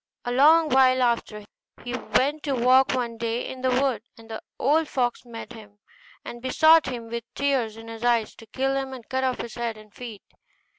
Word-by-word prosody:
A 245 - -2
long 310 +5 +5
while 255 -1 +4
after, 230 -3 -1 0.4
he 245 0 -4
went 285 +4 0
to 280 -3 -2
walk 255 +2 +4
one 235 -3 -3
day 230 +1 -2
in 260 - -8
the 260 - +1
wood, 260 0 +1 0.2
and 225 0 -14
the 220 - -6 0.2
old 305 +4 +2
fox 245 -4 -1
met 235 0 -9
him, 210 -3 -14 0.5
and 240 - -8
besought 315 +4 +5
him 240 -3 -5
with 235 0 -5
tears 260 -6 0
in 225 0 -11
his 225 0 -8
eyes 235 -3 +1
to 225 - -14
kill 270 +4 -1
him, 270 -1 -3
and 250 -3 -10
cut 260 0 -1
off 255 -1 0
his 235 - -8
head 235 -2 -4
and 215 -1 -16
feet. 230 -5 -9
245 Hz, 205 wpm, -25 LUFS, 230-265 Hz, 0.5 s, long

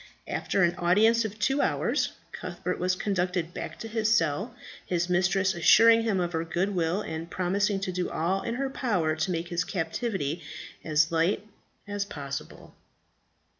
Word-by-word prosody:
After 195 - 0
an 175 0 +3
audience 220 +7 +4
of 215 -1 -5
two 270 +7 +1
hours - - 0 0.2
Cuthbert - - -4
was 185 0 +1
conducted 180 -3 -1
back - - -6
to 225 - -6
his 220 -1 0
cell, 200 - +1 0.3
his 175 0 -1
mistress 190 +2 +2
assuring 225 +6 +6
him 220 -4 0
of 175 -1 -1
her 160 0 0
good 180 +4 -1
will, 175 +2 0
and 160 +1 -5
promising 195 +3 0
to 190 - -2
do 180 0 -2
all 185 +4 0
in 230 - -3
her 270 +1 -2
power 180 - 0
to 155 +4 -1
make 170 0 -3
his 175 0 0
captivity 165 - -2 0.4
as 155 0 +2
light 170 +5 +1 0.4
as 205 0 -2
possible. 140 -7 -7
185 Hz, 165 wpm, -27 LUFS, 170-210 Hz, 0.4 s, assuring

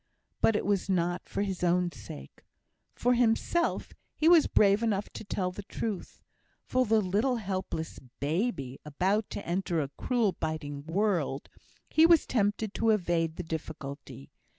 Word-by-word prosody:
But 225 - +4
it - - 0
was 200 -1 0
not 175 -1 0
for 200 - -1
his 190 -3 -3
own 175 0 +2
sake. 100 - -11 0.5
For 245 +1 +2
himself, 245 +8 +1 0.2
he 315 - +2
was 335 -3 +7
brave 200 +1 +4
enough 210 -3 0
to - - -8
tell 185 -3 -2
the 195 - -7
truth; 205 0 -5 0.5
for 255 -1 +1
the 220 +1 +4
little 210 +7 +1
helpless 185 -6 -4 0.2
baby, 150 - -1
about 190 +8 0
to - - -6
enter 175 -1 -1
a 140 -3 -1
cruel, 235 -5 +1
biting 150 -4 -4
world, 170 -6 0 0.4
he 320 +1 +5
was 335 -2 +5
tempted 205 -2 0
to 225 - +1
evade 170 -6 +1
the 180 - -5
difficulty. 145 - -7
190 Hz, 150 wpm, -29 LUFS, 160-220 Hz, 0.5 s, was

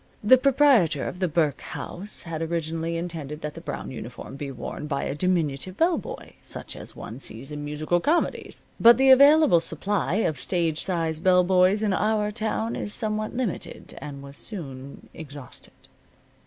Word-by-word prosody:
The 255 +5 +7
proprietor 255 - +4
of 180 - -6
the 185 - +1
Burke 155 -3 0
House 200 +4 -7
had 165 -2 -5
originally 165 0 -2
intended 160 -3 -5
that 150 0 -4
the - - -9
brown - - -6
uniform - - -8
be 140 0 -5
worn 135 +3 -6
by 140 -2 -2
a - - -2
diminutive 170 0 -1
bell 335 +1 +3
boy, - - -9
such - - -6
as - - -8
one 115 - -8
sees 135 +2 -6
in 150 0 -5
musical 155 +4 0
comedies. 315 - -1 0.2
But 235 0 +8
the 265 0 +6
available 280 - +7
supply 170 +3 -1
of 160 -10 0
stage 165 +2 0
size 165 -4 -1
bell 180 +1 +4
boys 185 +3 +3
in 205 -2 +1
our 210 +1 +1
town 220 +1 -2
is 205 - -3
somewhat 215 +1 -2
limited 240 -9 -4
and 140 -2 -8
was 140 0 -9
soon 140 - -7
exhausted. 145 -4 -10
170 Hz, 170 wpm, -25 LUFS, 150-215 Hz, 0.2 s, But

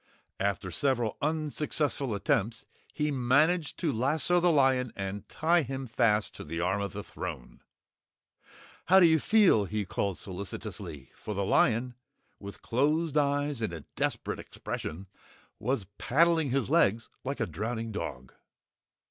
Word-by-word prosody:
After 100 -2 -1
several 120 - 0
unsuccessful 150 -4 0
attempts 105 +3 0 0.3
he 150 0 -1
managed 145 +6 +2
to 165 -5 0
lasso 150 +9 +2
the 175 0 +4
lion 130 -4 +3
and 100 +1 -5
tie 170 +2 +2
him 135 -1 -4
fast 110 -3 +1
to - - -7
the 80 +2 -5
arm 95 +4 0
of 100 -3 -4
the - - -5
throne. - - -7 1.2
"How 190 +2 +7
do 180 - +7
you 160 -1 +5
feel?" 195 - +4
he 105 +1 -2
called 95 +1 -2
solicitously, 90 - -7
for 105 - -6
the 100 0 0
lion, 120 +5 +2 0.5
with 100 0 -10
closed 150 +5 +1
eyes 145 -2 +1
and 110 -5 -1
a 80 -3 -8
desperate - - -2
expression, 90 +6 -6 0.5
was 125 -6 -1
paddling 160 +1 +3
his 130 -4 0
legs 110 +4 +2
like 140 +2 -3
a 115 - +1
drowning 110 +6 -4
dog. 65 - -6
120 Hz, 140 wpm, -29 LUFS, 100-150 Hz, 1.2 s, How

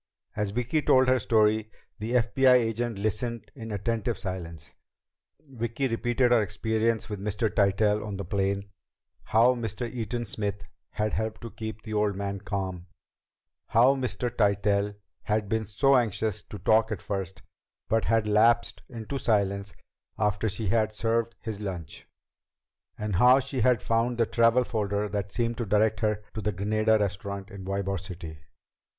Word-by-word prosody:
As 105 -1 -1
Vicki 125 +8 0
told 130 -2 +4
her 130 0 +4
story, 110 -1 +2 0.3
the 110 +3 -3
FBI 125 +2 +4
agent 115 -1 0
listened 110 +1 -3
in 115 -4 -8
attentive 115 +3 -1
silence. 85 -5 -6 0.7
Vicki 120 +1 -2
repeated 120 +1 +1
her 120 -2 +5
experience 110 +2 0
with 105 -2 -5
Mr. 105 +2 -1
Tytell 105 +1 +2
on 105 -2 -5
the 100 - -5
plane; 100 +2 -1 0.5
how 115 +4 +4
Mr. 115 -1 -4
Eaton 120 0 -3
Smith 100 0 -4 0.3
had 105 0 -1
helped 110 0 -2
to 115 - -7
keep 110 -1 -7
the 110 - -6
old 105 -1 +1
man 100 0 -3
calm; 95 -3 -4 0.8
how 125 +4 +5
Mr. 120 -2 -3
Tytell 100 -1 +1 0.3
had 105 0 0
been 110 +2 -1
so 135 +6 +3
anxious 110 -4 0
to 105 - -10
talk 110 +2 +3
at 105 - -2
first, 95 -2 -5 0.4
but 115 0 +1
had 115 0 +2
lapsed 115 +3 +3
into 120 +3 -5
silence 100 -3 0 0.4
after 105 +1 +1
she 105 0 -3
had 110 0 +1
served 115 +1 0
his 110 -3 -5
lunch; 90 -7 -6 0.9
and 105 -4 -2
how 125 +5 +7
she 135 -1 -3
had 125 -1 +3
found 115 +1 +1
the 115 - +3
travel 115 +2 +3
folder 105 -3 -1
that 100 0 -3
seemed 115 +1 -1
to 120 - -1
direct 105 +1 +2
her 105 0 0
to 110 - -4
the 105 +1 0
Granada 110 +3 +2
Restaurant 100 0 -3
in 100 -2 -8
Ybor 100 0 -2
City. 85 -4 -8
110 Hz, 155 wpm, -27 LUFS, 100-115 Hz, 0.9 s, how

